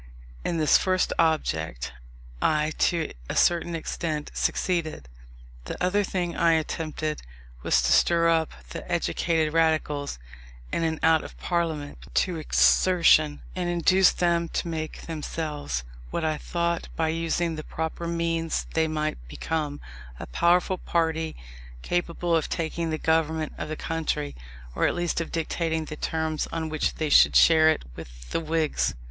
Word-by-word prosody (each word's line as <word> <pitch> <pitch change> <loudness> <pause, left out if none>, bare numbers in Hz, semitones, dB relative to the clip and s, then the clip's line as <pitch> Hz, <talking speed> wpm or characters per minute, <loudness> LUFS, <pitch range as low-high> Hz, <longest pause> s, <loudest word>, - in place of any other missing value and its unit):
In 170 - -1
this 155 -2 +5
first 185 -1 +1
object 80 - 0 0.5
I, 155 0 +2 0.2
to 165 -3 -2 0.2
a - - -3
certain 170 0 +2
extent, 155 -2 -3
succeeded. 160 - -1 0.6
The - - -5
other 195 +3 +2
thing 180 -3 -2
I 170 -1 +4
attempted, 155 -1 -2 0.4
was - - +2
to - - +2
stir 170 -1 +4
up 165 -1 +2 0.2
the - - -7
educated 165 -2 0
Radicals, 155 - +1 0.6
in - - 0
and 160 -1 -1
out 160 -1 +4
of - - -10
Parliament, 160 -5 -2 0.2
to 180 -3 +1
exertion, 155 -1 +4
and 180 -1 -1
induce 180 +2 +4
them 170 -1 +1
to - - -1
make 160 -1 -4
themselves, 150 - -4 0.3
what 160 - -2
I 155 -1 +1
thought 170 +1 -2
by 160 -1 0
using 165 +1 0
the 155 -1 -6
proper 160 +2 -4
means 165 -1 -1
they 160 0 +2
might 155 - -2
become 150 - -3 0.4
a - - -5
powerful 175 - +2
party 160 -1 -1 0.5
capable 175 -1 0
of 160 - 0
taking 165 0 -2
the 155 - -1
government 160 -1 0
of 155 - -4
the 155 - -3
country, 155 -2 -2 0.4
or - - +2
at - - -1
least 175 -1 -1
of 165 - -5
dictating 160 0 -1
the 155 - -6
terms 160 0 -2
on 160 -1 -3
which 155 -1 -1
they 155 -1 -2
should - - +6
share 160 -1 +7
it 160 - +1
with - - -11
the - - 0
Whigs. 160 -1 0
160 Hz, 150 wpm, -26 LUFS, 155-170 Hz, 0.6 s, share